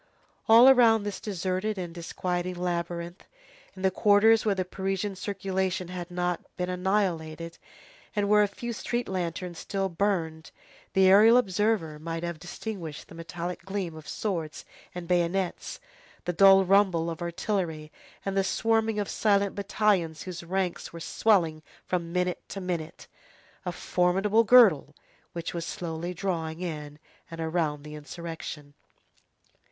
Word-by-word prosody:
All 230 +3 +9
around 235 -5 +6
this 205 -1 -4
deserted 190 +1 -2
and 175 -2 -5
disquieting 180 +1 -3
labyrinth, 175 0 -4 0.5
in 185 - -9
the 190 - +3
quarters 215 +3 +5
where 210 -2 +1
the 185 -1 -1
Parisian 195 +1 -3
circulation 190 -2 -2
had 180 -1 -6
not 180 0 -1 0.2
been 180 0 -2
annihilated, 175 -4 -1 0.6
and 205 -1 +1
where 210 0 +5
a 205 - +4
few 235 +4 -6
street 240 +2 -3
lanterns 175 -1 -4
still 195 -1 -2
burned, 165 -4 -1 0.4
the 190 0 +5
aerial 215 +5 +7
observer 200 -7 0
might 165 +1 -5
have 170 -2 -4
distinguished 175 -3 -7
the - - -12
metallic 170 +2 -6
gleam 190 -4 -4
of 155 -1 -11
swords 170 -7 -4 0.3
and 175 -1 -6
bayonets, 180 +1 -1 0.5
the 175 - -1
dull 195 +2 +7
rumble 185 -3 +3
of 165 - -8
artillery, 170 -3 -3 0.3
and 195 0 -2
the 195 - +3
swarming 225 +2 +1
of 205 -1 -1
silent 200 -2 +1
battalions 195 -5 0
whose 180 -2 -6
ranks 185 +1 -2
were 170 - -8
swelling 165 -4 +1 0.2
from 170 -2 -2
minute 180 0 -1
to 195 - -5
minute; 175 -3 -4 0.6
a - - 0
formidable 190 +6 +2
girdle 220 - +6 0.4
which 170 -1 -5
was 170 -1 -3
slowly 170 0 -4
drawing 165 -3 -3
in 150 -4 -5 0.3
and 165 - -8
around 160 -3 -1
the 150 0 -9
insurrection. 150 -1 -8
180 Hz, 140 wpm, -27 LUFS, 170-200 Hz, 0.6 s, All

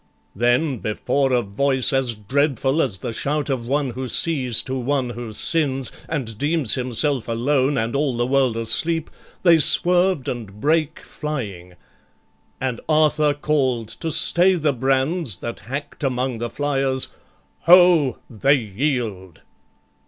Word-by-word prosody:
Then, 120 +5 +1
before 135 +6 -1
a 125 -1 +2
voice 130 +7 0
As 130 -3 0
dreadful 135 +6 0
as 115 -10 0
the 115 - -5
shout 145 +4 -2
of 120 -3 -3
one 140 0 0
who 130 +2 -5
sees 130 -3 +1
To 130 - -5
one 130 -1 -1
who 120 -1 -7
sins, 135 +1 0 0.2
and 120 -9 -4
deems 150 -4 +1
himself 130 +1 -1
alone 130 +4 +1
And 115 +2 -1
all 140 -4 0
the 120 - +1
world 130 -3 +1
asleep, 160 +8 -1 0.3
they 170 -3 +6
swerved 180 -2 +3
and 105 -4 -6
brake 155 +4 0
Flying, 105 - -6 0.9
and 130 -3 -3
Arthur 155 -1 +3
call'd 130 -7 -1
to 160 +8 -5
stay 180 +4 +3
the 155 -4 0
brands 135 - 0
That 115 +4 -6
hack'd 140 +9 -7
among 130 -2 -1
the 120 0 -3
flyers, 135 -2 -1 0.6
"Ho! 175 -7 +6
they 135 +5 +2
yield!" 110 - -3
135 Hz, 135 wpm, -21 LUFS, 120-150 Hz, 0.9 s, they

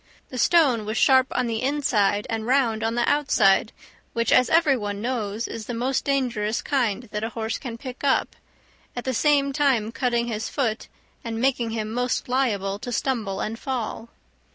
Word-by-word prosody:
The 255 - -6
stone 275 -10 +4
was 215 +2 -3
sharp 260 -1 +5
on 250 - -1
the 225 -2 -2
inside 240 -8 +1
and 225 0 -3
round 245 -4 +2
on 225 +1 0
the 240 0 +1
outside, 235 -8 +3 0.4
which, 230 -1 0
as 250 -1 +5
every 320 -4 +4
one 205 -4 -4
knows, 225 -2 -2
is 225 -2 -7
the 245 - -3
most 255 +3 -1
dangerous 240 -6 -1
kind 245 -5 0
that 210 +1 -3
a 225 - -1
horse 225 -1 -3
can 240 -4 -6
pick 255 +2 -9
up, 275 - +1 0.6
at 245 - -4
the 260 - -2
same 280 +1 +2
time 265 -7 +1
cutting 240 -1 0
his 225 -2 -3
foot 235 -6 -2 0.4
and 225 -2 -4
making 245 -2 +1
him 220 -1 -3
most 245 +1 -1
liable 205 -7 0
to 245 - -6
stumble 225 -6 -1
and 225 +2 -4
fall. 235 -3 -4
235 Hz, 180 wpm, -24 LUFS, 220-265 Hz, 0.6 s, sharp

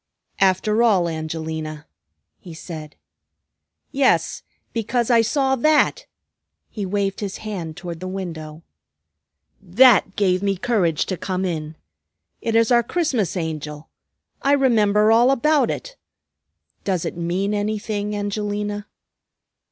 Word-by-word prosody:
"After 195 +4 +2
all, 200 -7 +4
Angelina," 160 -1 -5 0.5
he 170 -3 -11
said. 155 -2 -8 1.0
"Yes, 275 -2 +2 0.3
because 235 +2 0
I 230 -1 +6
saw 265 +3 +1
that," 310 - +2 0.6
he 205 -3 -4
waved 195 0 -1
his 200 -2 -4
hand 175 -7 -5
toward 175 -2 -7
the 185 - -6
window. 165 -4 -6 1.0
"That 200 +1 +5
gave 185 -2 +2
me 200 -1 0
courage 185 -8 +1
to 185 - -3
come 185 +1 -2
in. 160 -3 -4 0.7
It 225 -1 -1
is 230 +1 +3
our 240 -1 +6
Christmas 240 - -1
Angel. 155 -2 -5 0.5
I 280 - +3
remember 215 -6 +3
all 235 +3 +5
about 275 -1 +3
it. - - -5 0.9
Does 185 -4 -1
it - - -4
mean 180 +4 -1
anything, 210 0 -2
Angelina?" 205 0 -3
200 Hz, 120 wpm, -22 LUFS, 170-230 Hz, 1.0 s, I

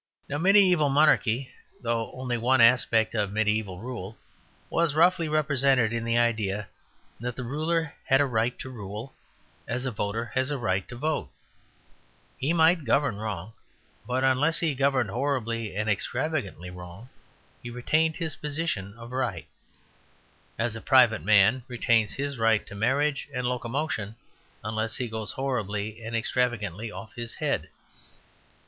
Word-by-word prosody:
Now 145 - -2
mediæval 180 -4 +5
monarchy, 135 -4 +3 0.3
though 115 -2 -2
only 125 -1 -3
one 125 +3 +2
aspect 115 -2 +4
of 105 -3 0
mediæval 105 -3 0
rule, 110 -3 -7 0.5
was 165 -3 +1
roughly 170 0 +4
represented 135 -6 +3
in 115 -1 -2
the 115 0 +1
idea 105 -4 0 0.5
that 120 +1 -4
the 125 - -5
ruler 155 +5 -1
had 135 - +4
a 145 - +4
right 120 -1 0
to 130 - -7
rule 105 +2 -7 0.5
as 125 +2 -3
a 130 - -1
voter 105 +2 -2
has 130 +1 +1
a 145 - -1
right 95 -6 -1
to 125 - -8
vote. 145 - -2 1.1
He 140 +5 0
might 165 0 +4
govern 135 -3 +1
wrong, 105 -1 -5 0.5
but 125 +1 0
unless 135 +5 +3
he 160 -3 +1
governed 135 -5 +1
horribly 115 -4 -2
and 105 +1 -1
extravagantly 105 - -2
wrong, 90 +6 -10 0.5
he 120 - -7
retained 155 +7 +1
his 165 -2 -4
position 145 - -3
of 120 +1 -10
right; 125 -10 -2 1.1
as - - -1
a - - -7
private - - +5
man 110 +5 +5
retains 115 -3 +1
his 140 -2 -3
right 115 -1 +3
to - - -11
marriage 135 +8 0
and 125 0 -1
locomotion 125 -2 -2 0.5
unless 110 +1 -2
he 125 - -2
goes 110 -1 -4
horribly 110 -4 -3
and 115 +1 -4
extravagantly 115 -3 -1
off 110 +1 -9
his 120 -1 -6
head. - - -1
120 Hz, 145 wpm, -27 LUFS, 110-140 Hz, 1.1 s, mediæval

